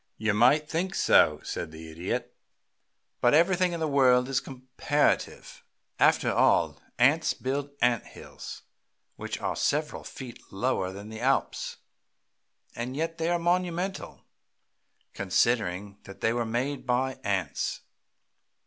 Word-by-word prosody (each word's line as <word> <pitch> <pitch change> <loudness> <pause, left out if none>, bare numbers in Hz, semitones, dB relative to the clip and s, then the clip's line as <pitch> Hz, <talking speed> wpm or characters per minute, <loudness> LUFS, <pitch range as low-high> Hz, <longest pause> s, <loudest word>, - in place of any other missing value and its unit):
"You 110 -1 0
might 135 +8 +4
think 185 +5 -2
so," 75 -1 +4
said - - -4
the 80 0 -10
Idiot. 85 +3 -4 0.8
"But 120 +4 +4
everything 180 +2 +3
in 170 - -3
the 160 - 0
world 130 -3 +4
is 135 - +2
comparative, 130 +3 -1 0.4
after - - +4
all. - - +3 0.2
Ants 145 +7 +3
build 140 +2 -3
ant 120 -1 +2
hills - - -10 0.5
which - - -5
are - - -2
several 150 +1 -1
feet 125 -3 -9
lower 95 -3 -1
than 100 +2 -9
the 110 +1 -8
Alps, 135 +2 0 1.0
and 125 +3 -4
yet 165 +1 -2
they 165 +1 0
are 175 - +2
monumental, 180 +2 -2 0.9
considering 100 0 0
that 100 - -12
they 115 - +2
were 120 -1 -1
made 130 +4 -2
by 130 +2 0
ants. 95 -7 -2
130 Hz, 130 wpm, -28 LUFS, 110-150 Hz, 1.0 s, might